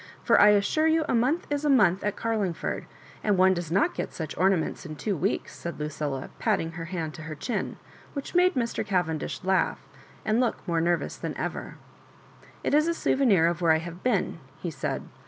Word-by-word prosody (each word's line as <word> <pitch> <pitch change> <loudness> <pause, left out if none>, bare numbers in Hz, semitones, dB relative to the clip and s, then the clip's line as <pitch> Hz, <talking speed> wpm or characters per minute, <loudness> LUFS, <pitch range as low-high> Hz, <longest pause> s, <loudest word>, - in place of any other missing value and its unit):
— - - -26
for - - +5
I 205 - +8
assure 210 +10 +3
you 320 -1 +3
a - - 0
month 255 +9 +2
is 290 0 0
a 300 - +2
month 200 -9 +4
at 205 0 -1
Carlingford; 215 -7 -2 0.4
and 205 -3 +2
one 190 +1 +6
does 175 -3 -4
not 195 - +2
get - - -4
such 160 -2 -5
ornaments 185 -2 +1
in 155 -2 -7
two 190 +8 -2
weeks," 150 - -2
said 170 -2 -6
Lucilla, 150 -3 -3
putting 165 - 0
her 165 0 -6
hand 165 -3 -4
to 155 - -9
her 155 0 -6
chin, 235 - -3 0.4
which 280 -2 -5
made 365 +1 +4
Mr. 235 -3 -1
Cavendish 180 -7 -1
laugh, 190 0 +1 0.4
and 220 +2 +2
look 250 -2 -1
more 165 -2 +1
nervous 170 +1 0
than - - -5
ever. - - -4 0.5
*' - - -24
It - - 0
is 305 +2 +4
a 335 - +1
souvenir 230 - +3
of 170 +1 0
where 165 -2 +5
I - - +4
have 170 +2 -7
been," 210 -8 0 0.2
he 175 - -4
said. 135 -3 -3
185 Hz, 210 wpm, -27 LUFS, 165-235 Hz, 0.5 s, I